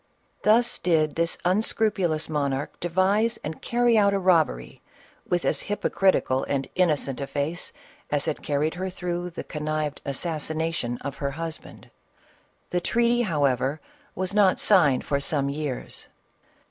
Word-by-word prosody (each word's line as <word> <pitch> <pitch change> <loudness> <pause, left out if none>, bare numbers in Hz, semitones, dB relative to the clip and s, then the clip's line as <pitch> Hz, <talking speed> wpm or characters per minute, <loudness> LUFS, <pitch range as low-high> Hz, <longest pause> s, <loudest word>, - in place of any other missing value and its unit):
Thus 235 +3 +3
did 155 -4 +2
this 170 0 0
unscrupulous 190 -4 +1
monarch 140 -2 -2
devise 195 +6 +1
and 155 +1 -6
carry 240 -2 +3
out 200 -1 +4
a - - +1
robbery, 165 - +1 0.5
with 175 -1 0
as - - +1
hypocritical 190 -9 +1
and 135 -1 -1
in 180 -2 +3
nocent 140 -2 -1
a 140 - -3
face 150 +5 -3 0.4
as 145 -1 0
had 155 - -2
carried 150 +2 0
her 185 +2 -3
through 180 -1 -3
the 170 - -7
connived 150 -1 -3
assassination 155 -3 -2
of 140 -1 -5
her 140 - -2
husband. 165 -1 -7 0.8
The 180 - 0
treaty, 235 +4 +2
however, 145 - +1 0.4
was 185 +1 -2
not 205 -3 +4
signed 150 -11 +4
for 140 - 0
some 140 -1 0
years. 145 -2 -4
165 Hz, 140 wpm, -25 LUFS, 145-190 Hz, 0.8 s, out